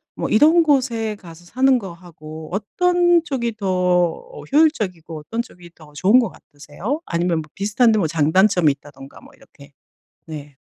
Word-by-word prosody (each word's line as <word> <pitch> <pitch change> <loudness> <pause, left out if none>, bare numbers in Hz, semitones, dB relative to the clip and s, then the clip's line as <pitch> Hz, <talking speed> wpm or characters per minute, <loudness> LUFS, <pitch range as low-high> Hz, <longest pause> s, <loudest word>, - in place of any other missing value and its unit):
뭐 - - -3
이런 315 +9 +5
곳에 245 -7 0
가서 170 -3 -14
사는 260 +7 +2
거하고 165 -5 -11
어떤 350 - +2
쪽이 235 -7 -3
더 205 - -6 0.7
어 - - -11
효율적이고 200 - 0
어떤 225 +10 -4
쪽이 175 -7 -14
더 155 -2 -17
좋은 195 +11 +4
것 235 -5 0
같으세요? 160 - -7
아니면 170 -1 -1
뭐 150 - -13
비슷한데 215 +3 +2
뭐 165 - +1
장단점이 165 +2 +3
있다든가 140 -1 -15
뭐 - - -18
이렇게 140 0 -19 0.5
네. 145 -3 -10
190 Hz, 320 characters per minute, -20 LUFS, 160-250 Hz, 0.7 s, 이런